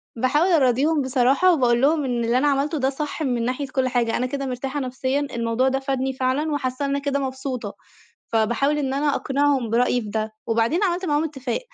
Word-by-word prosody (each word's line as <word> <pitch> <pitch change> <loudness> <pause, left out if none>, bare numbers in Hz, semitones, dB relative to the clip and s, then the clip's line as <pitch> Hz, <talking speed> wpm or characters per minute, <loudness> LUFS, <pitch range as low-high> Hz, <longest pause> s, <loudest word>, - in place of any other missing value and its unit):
باحاول 260 +8 +2
أراضيهم 290 +1 +3
بصراحة 265 +7 +3
وباقول 245 -4 +2
لهم 300 +1 +3
إن 240 -2 -1
اللي 235 +2 +2
أنا 280 +3 +2
عملته 285 +3 +1
ده 265 -1 +1
صح 295 +3 -5
من 245 -4 0
ناحية 260 +3 -2
كلّ 260 0 0
حاجة، 240 -3 0
أنا 250 - -1
كده 275 +2 -3
مرتاحة 265 +2 -3
نفسيًا، 260 +1 -1
الموضوع 240 -2 -1
ده 265 0 +1
فادني 265 -1 -2
فعلًا 265 +4 -1
وحاسّة 270 -1 -2
إن - - -2
أنا 280 0 0
كده 280 0 -1
مبسوطة، 260 -5 -4 0.5
فباحاول 235 +6 +1
إن 270 -3 -1
أنا 285 0 +1
أقنِعهم 275 -3 0
برأيي 245 +2 +2
بده. 215 0 -3
وبعدين 230 - +1
عملت 365 -1 0
معاهم 295 -2 +1
إتّفاق، 270 -6 -3
265 Hz, 195 wpm, -23 LUFS, 245-285 Hz, 0.5 s, أراضيهم